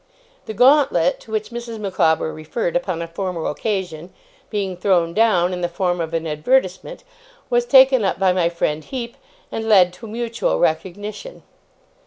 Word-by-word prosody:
The 220 - -6
gauntlet, 245 - +4
to 220 - -15
which 215 0 -3
Mrs. 235 -1 -6
Micawber 160 -6 0
referred 160 +4 -4
upon 175 -1 -1
a - - -6
former 175 -1 -4
occasion, 180 -3 -3 0.4
being 195 -3 -3
thrown 175 -2 +1
down 185 -4 +2
in 180 - -4
the 175 - -1
form 175 0 -1
of 160 -1 -4
an 165 0 -2
advertisement, 185 - -1 0.5
was 485 0 +2
taken 265 - +6
up 190 - 0
by 190 -1 +2
my 175 -2 +1
friend 155 -2 -2
Heep, 240 - -6 0.4
and 225 0 -4
led 185 -4 +5
to 225 +5 -11
a - - -10
mutual 230 - -2
recognition. 205 - -3
190 Hz, 165 wpm, -20 LUFS, 170-225 Hz, 0.5 s, taken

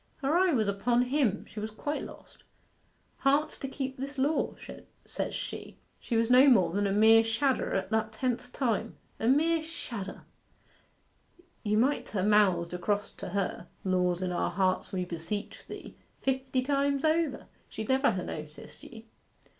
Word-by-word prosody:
Her 280 +4 +2
eye 365 0 +4
was 225 -8 +2
upon 235 +5 +2
him 250 -5 0
she 215 - -8
was 215 +1 -3
quite 290 +8 -3
lost - - -12 0.8
"Hearts 290 +3 +1
to 270 - -4
keep 265 -1 -4
this 275 +2 -6
law," 285 +4 +1 0.5
says - - -3
she; - - -6 0.2
she 230 - -2
was 230 +1 +2
no 255 +3 +8
more 195 -10 +5
than 200 +3 +1
a - - 0
mere 220 +2 +6
shadder 255 +4 0
at 190 +1 -2
that 220 0 +1
tenth 245 +1 -2
time 240 -6 -1 0.2
a 225 - 0
mere 320 +5 +3
shadder. 235 - -6 1.4
You 210 -1 +1
mi't 265 +6 +1
ha' 195 -3 -1
mouthed 190 -5 +3
across 205 +3 -1
to - - -7
her 195 +1 -2 0.2
"Laws 180 -1 +1
in 180 - -1
our 175 - 0
hearts 185 0 0
we 185 -1 -2
beseech 175 +4 -5
Thee," - - -9 0.2
fifty 265 -1 0
times 280 +1 +1
over 315 -3 +1 0.2
she'd 220 -1 -6
never 265 +1 +4
ha' 185 -5 -2
noticed 150 0 -8
ye. 225 0 -11
225 Hz, 160 wpm, -29 LUFS, 200-270 Hz, 1.4 s, no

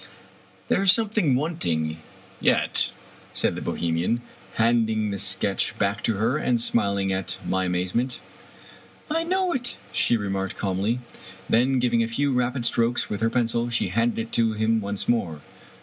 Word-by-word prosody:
" - - -29
There - - +2
is 195 -2 +7
something 210 - +2
wanting 85 - -1 0.4
yet," - - +2 0.4
said - - +1
the - - -5
Bohemian, 85 +8 -1 0.3
handing 110 -2 +2
the 100 - -3
sketch 95 +1 -1
back 100 0 0
to 115 - +1
her^ 115 +9 +1
and 120 -2 +2
smiling 100 -4 +1
at 95 0 -2
my 95 0 +1
amaze 90 0 -1
ment. 125 +2 0 0.5
" - - -18
I 325 +1 +2
know 365 +1 +1
it," 245 -4 -1
she 120 - +3
remarked 95 -2 -3
calmly. 100 +5 -1 0.5
Then, 130 +3 +3
giving 120 -2 +2
a 115 - +1
few 140 +4 0
rapid 125 0 0
strokes 115 +1 +1
with 105 - -3
her 115 - +3
pencil, 120 0 0
she 115 -5 0
handed 115 +4 +1
it 115 0 -4
to 115 -1 +2
him 110 +1 +1
once 100 0 -4
more. 85 -11 0
115 Hz, 165 wpm, -25 LUFS, 100-125 Hz, 0.5 s, is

